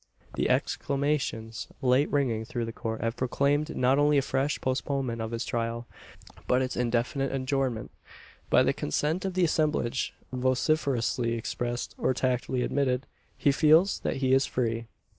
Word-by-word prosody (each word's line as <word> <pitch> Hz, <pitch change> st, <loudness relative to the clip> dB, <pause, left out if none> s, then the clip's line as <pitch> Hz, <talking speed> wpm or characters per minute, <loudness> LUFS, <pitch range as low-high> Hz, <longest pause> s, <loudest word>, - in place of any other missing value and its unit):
The -, -, 0 dB
exclamations 135 Hz, -6 st, -1 dB
late 130 Hz, +3 st, +3 dB
ringing 125 Hz, -6 st, +1 dB
through 115 Hz, +1 st, -3 dB
the 115 Hz, -, -6 dB
court 110 Hz, -2 st, -4 dB
have 115 Hz, +1 st, -1 dB
proclaimed 140 Hz, +4 st, 0 dB
not 130 Hz, +2 st, +3 dB
only 145 Hz, 0 st, +4 dB
a 140 Hz, -, +3 dB
fresh 135 Hz, +2 st, 0 dB
postponement 130 Hz, -2 st, -1 dB
of 110 Hz, -, -3 dB
his 115 Hz, +1 st, -3 dB
trial, 115 Hz, 0 st, -2 dB, 0.6 s
but 125 Hz, +1 st, +3 dB
its 130 Hz, -, -3 dB
indefinite 125 Hz, +3 st, 0 dB
adjournment. 130 Hz, -4 st, -1 dB, 0.6 s
By -, -, +5 dB
the -, -, +2 dB
consent 155 Hz, -, -1 dB
of 190 Hz, -1 st, -3 dB
the 185 Hz, -, +3 dB
assemblage, 150 Hz, -6 st, 0 dB, 0.2 s
vociferously 125 Hz, -2 st, +1 dB
expressed, 120 Hz, +1 st, -3 dB
or 130 Hz, -, +1 dB
tacitly 125 Hz, 0 st, 0 dB
admitted, 130 Hz, -2 st, 0 dB, 0.3 s
he 140 Hz, -, +3 dB
feels 160 Hz, +7 st, +4 dB
that -, -, -2 dB
he 130 Hz, -1 st, +1 dB
is 135 Hz, 0 st, +4 dB
free. 115 Hz, -2 st, -1 dB
130 Hz, 150 wpm, -28 LUFS, 120-140 Hz, 0.6 s, By